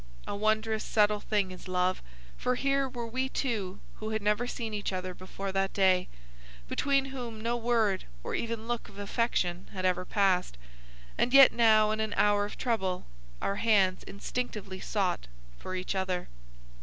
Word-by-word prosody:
A - - -4
wondrous 215 +1 +1
subtle 210 -1 +3
thing 205 -3 0
is 185 +1 -10
love, 185 0 +1 0.3
for 250 0 0
here 275 +1 +1
were 240 -2 -5
we 260 +3 -2
two 210 -9 -2 0.2
who 215 - -5
had 220 0 -1
never 210 +4 +1
seen 230 -3 -4
each 205 -1 -2
other 185 -1 -3
before 190 +2 -6
that 195 0 0
day, 185 -2 +3 0.6
between 275 - +2
whom 235 -4 -5
no 230 +2 -1
word 230 -5 +1 0.2
or - - -4
even 230 -1 -3
look 240 -1 -3
of 200 - -15
affection 200 -4 -1
had 185 -1 -3
ever 180 0 +2
passed, 185 - +1 0.6
and 250 +2 +3
yet 275 -1 +10
now 215 -2 +5
in 215 - -1
an 220 -1 -1
hour 205 0 +4
of 205 - -8
trouble 190 -7 -1 0.4
our 200 - 0
hands 195 -5 +3
instinctively 200 -2 -4
sought 185 - -1 0.3
for 185 - -5
each 185 +1 -2
other. 190 -2 -2
210 Hz, 170 wpm, -30 LUFS, 190-230 Hz, 0.6 s, yet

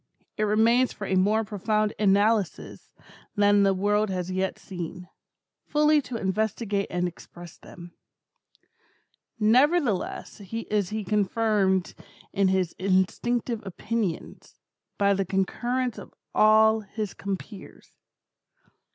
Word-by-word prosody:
It 215 - 0
remains 230 +4 +3
for 205 - -7
a 190 - -2
more 205 +4 +2
profound 215 +1 -1
analysis 205 -1 +1 0.4
than 205 -1 +4
the 195 -1 +4
world 205 +2 +1
has 185 -1 -3
yet 190 +1 -2
seen, 180 -1 -7 0.6
fully 300 0 +3
to 255 -3 -8
investigate 205 0 -1
and 180 0 -1
express 175 0 -12
them. 175 -1 -13 1.5
Nevertheless 245 - +1
is 210 -4 -2
he 215 0 -3
confirmed 200 -1 +1 0.4
in 195 -1 +2
his 185 -3 0
instinctive 215 +5 0
opinions, 205 -1 -4 0.4
by 200 0 +3
the 195 0 0
concurrence 240 +7 -1
of - - -13 0.2
all 220 +1 +5
his 215 0 -5
compeers. 200 +1 -8
205 Hz, 110 wpm, -26 LUFS, 190-220 Hz, 1.5 s, all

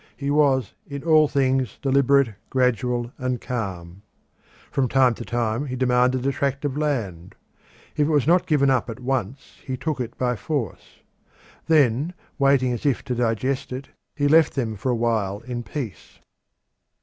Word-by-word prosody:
He 140 0 -2
was 140 -5 +2
in 140 -3 -6
all 155 -2 +5
things 130 -4 0
deliberate, 140 -2 +3 0.2
gradual, 125 -1 0
and 125 -1 -1
calm. 95 -7 -5 0.7
From 135 -2 +1
time 130 -1 +4
to 115 - -7
time 120 +3 -1
he 130 - -4
demanded 125 0 +2
a 140 - +2
tract 140 +1 -2
of 140 -2 -2
land; 110 - -3 0.6
if 150 - +2
it - - 0
was 145 -3 +3
not 180 +3 +3
given 140 -4 +3
up 125 -2 +1
at 115 +1 -6
once 130 -1 -4
he 130 -1 -4
took 155 0 -3
it 115 -1 -6
by 125 -1 0
force. 130 - -5 0.7
Then, 150 +1 +3 0.2
waiting 135 -2 +3
as 120 - -5
if 140 -5 +1
to 125 - -3
digest 125 +3 -1
it, 130 +2 -6 0.3
he 145 -2 +1
left 160 +1 +4
them 115 -5 -2
for 105 +6 -3
a 125 - +2
while 110 -4 -1
in 120 0 -5
peace. 120 - -7
130 Hz, 165 wpm, -23 LUFS, 120-140 Hz, 0.7 s, all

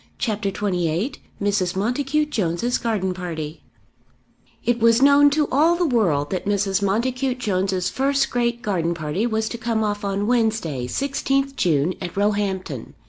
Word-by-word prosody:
CHAPTER 215 -4 -1
XXVIII 185 - -1 0.3
Mrs. 195 -3 0
Montacute 275 +8 0
Jones's 210 - 0
Garden 205 -6 -1
Party 165 -4 -6 1.0
It 240 0 +1
was 230 0 +5
known 285 +1 +6
to 295 +1 +1
all 315 +6 +4
the 350 0 +1
world 180 - +1
that 185 0 -3
Mrs. 200 -1 +1
Montacute 250 +6 0
Jones's 190 -5 0
first 275 +1 +1
great 240 0 -1
garden 170 -6 0
party 165 +8 -1
was 220 -1 -1
to 235 - -6
come 230 -2 0
off 205 0 -2
on 200 0 -1
Wednesday, 220 - 0
16th 275 - -1
June, 160 - +1
at 180 0 -6
Roehampton. 195 - -1
210 Hz, 145 wpm, -22 LUFS, 185-245 Hz, 1.0 s, known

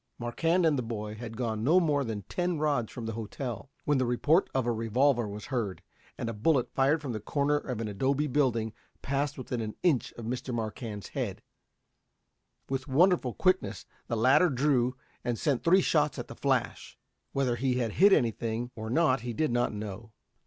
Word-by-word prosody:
Marquand 165 +9 +1
and 150 -4 +3
the - - +1
boy 105 -2 -5
had 115 0 -8
gone 110 -3 -2
no 165 +9 +5
more 150 -5 +2
than 110 -5 -4
ten 175 - -1
rods 145 -7 0
from 120 - -6
the 115 - -2
hotel, 115 +1 -5 0.2
when 145 -2 +2
the 130 - +2
report 150 +9 +3
of 130 -2 0
a 120 - +1
revolver 120 +2 +2
was 105 +1 -7
heard, 105 -7 -2 0.3
and - - -3
a 115 - -2
bullet 125 +3 +1
fired 145 +4 +2
from 135 - -3
the 110 - -3
corner 140 +7 0
of 125 -5 -4
an 115 - -2
adobe 135 +8 0
building 120 -6 +1 0.3
passed 140 +1 -1
within 125 -2 -3
an 110 -1 -4
inch 155 -9 +2
of 115 - -8
Mr. 125 +2 -3
Marquand's 110 -3 -4
head. - - -4 1.2
With 135 +1 -3
wonderful 150 -2 +3
quickness 185 0 +1 0.2
the 115 - -1
latter 130 +10 +5
drew 130 -2 +2 0.3
and 120 -1 -1
sent 140 -1 0
three 185 +3 +5
shots 150 -4 +2
at - - -5
the - - -8
flash. - - -1 0.3
Whether 130 -3 +1
he 130 +1 +1
had 120 -3 0
hit 200 - +5
any 120 -11 +4
thing 115 +2 -4
or 110 -1 -5
not 135 -1 +3
he 120 0 -4
did 155 +3 0
not 120 0 +1
know. 105 +1 -7
125 Hz, 195 wpm, -29 LUFS, 115-145 Hz, 1.2 s, no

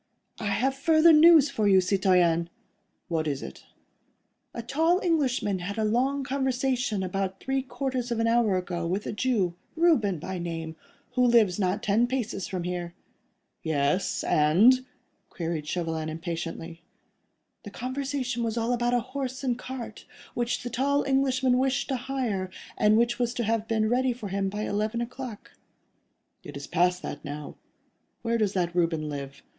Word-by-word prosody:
"I 215 - -3
have 225 +7 +1
further 315 +4 +5
news 310 -2 +7
for 215 -6 0
you, 190 -1 +6
citoyen." 180 -3 +2 0.6
"What 160 -3 -1
is 140 -2 -2
it?" 65 - -10 0.9
"A 235 - -6
tall 325 +9 +2
Englishman 265 - +1
had 200 +4 -5
a 220 - 0
long 260 +6 +1
conversation 255 -5 -1
about 190 +1 -3
three 270 0 -1
quarters 260 -2 -3
of 235 -1 -1
an 230 - +2
hour 230 -4 +3
ago 175 -2 -3
with 190 +4 -2
a - - -3
Jew, 210 -6 0 0.2
Reuben 305 - +3
by 185 +4 -5
name, 165 -2 -5 0.4
who 250 0 +2
lives 230 -6 +4
not 190 +2 0
ten 220 +4 +3
paces 235 -7 -3
from 185 -2 -4
here." 175 -1 -4 0.7
"Yes—and?" 160 - +3 0.5
queried 165 -3 -4
Chauvelin, 160 -2 -2
impatiently. 165 0 -5 0.8
"The 205 - -9
conversation 255 +1 -3
was 230 0 -2
all 230 +1 0
about 240 0 +1
a 245 - +2
horse 260 +1 -5
and 250 -2 +1
cart, 245 -3 -8 0.3
which 240 0 -1
the 245 - -5
tall 280 +4 +1
Englishman 260 -2 +2
wished 270 +1 0
to 270 - 0
hire, 245 -7 -2 0.3
and 210 +1 +4
which 235 +1 +1
was 240 0 0
to 240 - -1
have 225 0 0
been 220 -1 +1
ready 250 +2 +2
for 230 -4 -7
him 195 0 -1
by 210 +2 -4
eleven 215 +3 -1
o'clock." 240 -2 -6 0.9
"It 145 -1 -8
is 140 - -7
past 180 +1 +1
that 145 - -6
now. 145 0 -7 0.7
Where 230 0 0
does 205 -2 +1
that 175 -2 -1
Reuben 165 -3 +1
live?" 140 -1 -7
220 Hz, 160 wpm, -27 LUFS, 180-255 Hz, 0.9 s, news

